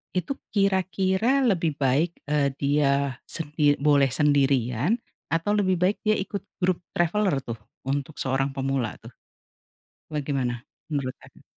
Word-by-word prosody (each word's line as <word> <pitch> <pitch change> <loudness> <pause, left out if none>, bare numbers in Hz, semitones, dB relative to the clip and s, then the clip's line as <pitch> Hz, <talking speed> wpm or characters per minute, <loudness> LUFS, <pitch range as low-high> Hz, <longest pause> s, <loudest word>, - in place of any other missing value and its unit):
itu 185 +10 0 0.2
kira-kira 195 +5 +2
lebih 175 - +1
baik, 140 +4 +2 0.2
eee, 145 -2 +2
dia 140 -2 +1
sendi 150 -2 +1
boleh 145 -1 +4
sendirian 135 - +2 0.3
atau 165 +5 0
lebih 190 -2 +2
baik 180 +4 +1
dia 215 0 +4
ikut 195 0 -4 0.2
grup 180 -1 +2 0.2
traveller 175 -3 +1
tuh, 115 -2 -6 0.3
untuk 140 +2 -2
seorang 135 +1 0
pemula, 135 -4 -1
tuh? - - -11 1.0
Bagaimana 135 -5 -1 0.3
menurut 135 -3 -2
Kakak? - - -18
150 Hz, 125 wpm, -25 LUFS, 135-185 Hz, 1.0 s, boleh